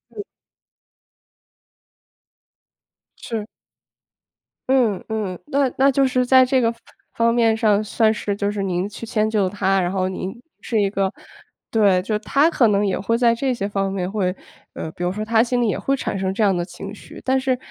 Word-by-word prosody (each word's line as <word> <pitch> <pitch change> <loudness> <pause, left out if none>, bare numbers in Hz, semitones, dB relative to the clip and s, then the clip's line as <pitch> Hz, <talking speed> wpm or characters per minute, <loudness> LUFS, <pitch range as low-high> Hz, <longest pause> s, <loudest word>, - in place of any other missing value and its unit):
嗯。 420 - -4 3.0
是。 225 -3 -5 1.2
嗯， 240 -8 +2
嗯， 210 -5 -3
那 280 -3 +1
那 275 +1 +5
就 275 0 +3
是 255 -1 +1
在 260 +1 +6
这 255 0 +2
个 230 0 +1 0.4
方 230 0 +2
面 230 -2 +3
上 215 -2 +2
算 220 +1 +2
是 205 -2 -3
就 200 0 -1
是 205 -1 -3
您 185 0 -1
去 215 +2 -8
迁 215 -1 0
就 205 -4 +1
他， 195 -1 +1
然 175 +1 -1
后 185 -1 0
您 190 0 -4 0.3
是 225 -3 -1
一 200 - +2
个 195 -1 -1 0.6
对， 200 -5 +3
就 210 +3 -1
他 280 +9 +2
可 240 -8 +3
能 205 0 +2
也 190 - 0
会 230 +4 0
在 235 -1 +4
这 255 +2 -1
些 200 -4 -3
方 195 -1 -1
面 185 -2 -2
会 190 -3 -1 0.4
呃， 160 - -6
比 175 - -7
如 180 - 0
说 215 +2 -4
他 225 0 +3
心 245 0 0
里 235 - +2
也 - - 0
会 275 - 0
产 255 - -3
生 190 0 -1
这 215 +2 0
样 195 -3 +3
的 175 - -1
情 195 +3 -8
绪， - - -12
但 265 0 +2
是 260 -1 0
215 Hz, 205 characters per minute, -21 LUFS, 195-240 Hz, 3.0 s, 在